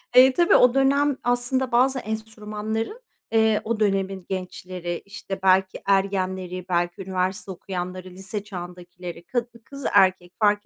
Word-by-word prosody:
Eee, 255 +1 +8
tabii 345 +4 +4
o 250 -1 +6
dönem 275 +1 +3
aslında 245 +1 0
bazı 260 +2 +3
enstrümanların, 220 - -4 0.3
eee, 220 -1 +3
o 225 0 -2
dönemin 195 -3 0
gençleri, 180 -2 -4
işte, 200 -1 -6
belki 190 0 +3
ergenleri, 190 -2 0
belki 175 +2 0
üniversite 190 +1 -2
okuyanları, 185 0 -5
lise 195 +3 -6
çağındakileri 180 -2 -8
ka 245 -2 -1 0.2
kız 275 -1 -9
erkek 185 -2 +4
fark 205 -1 +3
195 Hz, 130 wpm, -24 LUFS, 185-225 Hz, 0.3 s, Eee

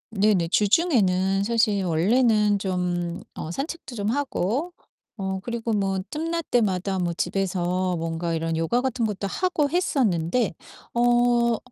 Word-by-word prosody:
네네 195 -4 +2
주중에는 195 - +2
사실 215 -3 +2
원래는 210 +4 +3
좀 180 -2 -2
어 155 - -6
산책도 275 - -5
좀 205 0 -1
하고 275 - -1 0.5
어 190 -1 -3
그리고 235 -1 -3
뭐 195 -2 0
틈날 330 +2 -2
때마다 195 -6 0
뭐 175 -1 -1
집에서 185 0 -1
뭔가 165 +1 -2
이런 165 0 -1
요가 165 +10 +1
같은 255 -3 -1
것도 200 -2 -3
하고 325 - 0
했었는데 235 - +1 0.4
어 240 -1 +3
205 Hz, 255 characters per minute, -24 LUFS, 180-245 Hz, 0.5 s, 원래는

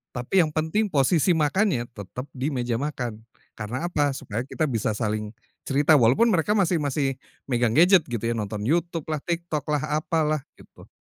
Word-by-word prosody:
Tapi 125 +10 +1
yang 155 - -3
penting 160 +8 0
posisi 160 +2 +2
makannya 150 - +1
tetap 110 +4 -8
di 130 +1 -3
meja 120 -2 -1
makan, 125 -6 -4 0.4
karena 120 +9 -4
apa? 145 -5 0
Supaya 120 -3 -4
kita 160 - -2
bisa 110 -3 -1
saling, 105 0 -3 0.3
cerita 145 +3 +4
walaupun 130 - +4
mereka 205 +3 +2
masih 180 -4 +2
masih 140 -2 -1 0.3
megang 120 -3 +1
gadget 180 +2 +6
gitu 120 -3 -4
ya, - - 0
nonton 105 -1 -4
YouTube 165 +4 0
lah, 155 - -1
TikTok 170 -4 -3
lah, 150 -2 0 0.2
apalah 155 -2 0
gitu. - - -17
145 Hz, 170 wpm, -25 LUFS, 120-165 Hz, 0.4 s, gadget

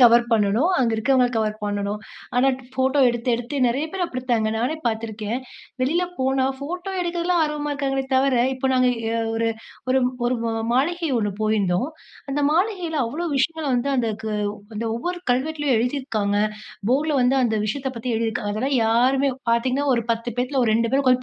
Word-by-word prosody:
Cover 235 0 +7
பண்ணணும். 225 - +3
அங்க 245 -3 +2
இருக்கவங்கள 250 +2 +3
கவர் 215 -1 0
பண்ணணும். 205 0 -2 0.4
ஆனா 255 +2 +4 0.2
ஃபோட்டோ 265 +2 +1
எடுத்து 240 +1 -2
எடுத்து 245 +5 -4
நெறைய 255 +5 0
பேரு 380 -1 -2
அப்டித்தாங்க. 250 -7 -1
நானே 245 +7 0
பாத்துருக்கேன். 220 0 -2 0.4
வெளில 305 +8 +2 0.2
போனா 265 0 +1
ஃபோட்டோ 355 +7 -5
எடுக்குறதுலாம் 345 0 0
ஆர்வமா 300 -1 -3
இருக்காங்களே 270 -1 -1
தவர. 265 0 +3 0.2
இப்ப 265 +1 -1
நாங்க 255 -1 +4 0.2
எ - - -1 0.2
ஒரு 230 0 +1 0.4
ஒரு 265 +1 +4 0.3
ஒரு 250 - +1
ம - - 0 0.2
மாளிகை 330 +7 +1
ஒண்ணு 205 -2 0
போயிருந்தோம். 215 0 +1 0.4
அந்த 290 +1 0
மாளிகையில 350 -2 0
அவ்வளோ 300 +10 -3
விஷயங்கள 320 +3 0
வந்து, 245 +3 0
அந்த 235 -3 +1
க - - -5 0.5
அந்த 225 - -2
ஒவ்வொரு 355 +9 -3
கல்வெட்லயும் 285 +1 +1
எழுதிருக்காங்க. 230 -5 -1 0.5
போர்ட்ல 295 +3 +2
வந்து 250 +2 +3
அந்த 230 -3 +1
விஷயத்த 265 +5 -2
பத்தி 235 +1 -3
எழுதிருக்கா, 225 -1 -1
அதெல்லாம் 260 +6 0
யாருமே 255 +5 +3 0.2
பாத்தீங்கன்னா, 255 +4 +1
ஒரு 235 -1 -1
10 230 0 -4
பேத்துல 255 +2 0
ஒரு 220 - +2
2 230 0 +1
பேரு 270 +2 +2
உக்கார்ந்து 255 -1 +4
255 Hz, 165 wpm, -23 LUFS, 230-285 Hz, 0.5 s, கவர்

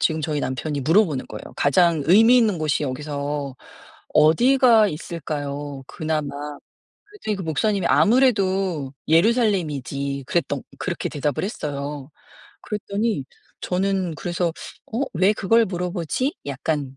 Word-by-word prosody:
지금 160 -1 +1
저희 150 -1 -1
남편이 140 +3 -3
물어보는 160 -1 +2
거예요. - - -9
"가장 165 +2 +3
의미 225 +7 +7
있는 215 -5 +2
곳이 155 -1 0
여기서 145 0 -3 0.6
어디가 225 - +5
있을까요 145 -3 -5
그나마?" 155 -1 -2 0.8
그랬더니 405 - -4
그 195 - -5
목사님이 185 +4 0
"아무래도 195 - +2 0.2
예루살렘이지." 160 - +1
그랬던 145 -5 -1 0.2
그렇게 180 -2 -3
대답을 145 -2 -2
했어요. 145 - -5 0.5
그랬더니 210 -5 -2 0.4
저는 185 -2 -1
그래서 175 +3 -1 0.4
'어 235 - 0
왜 190 +5 +4
그걸 225 +3 +3
물어보지?' 180 - -2
약간 140 0 -3
165 Hz, 300 characters per minute, -23 LUFS, 145-200 Hz, 0.8 s, 의미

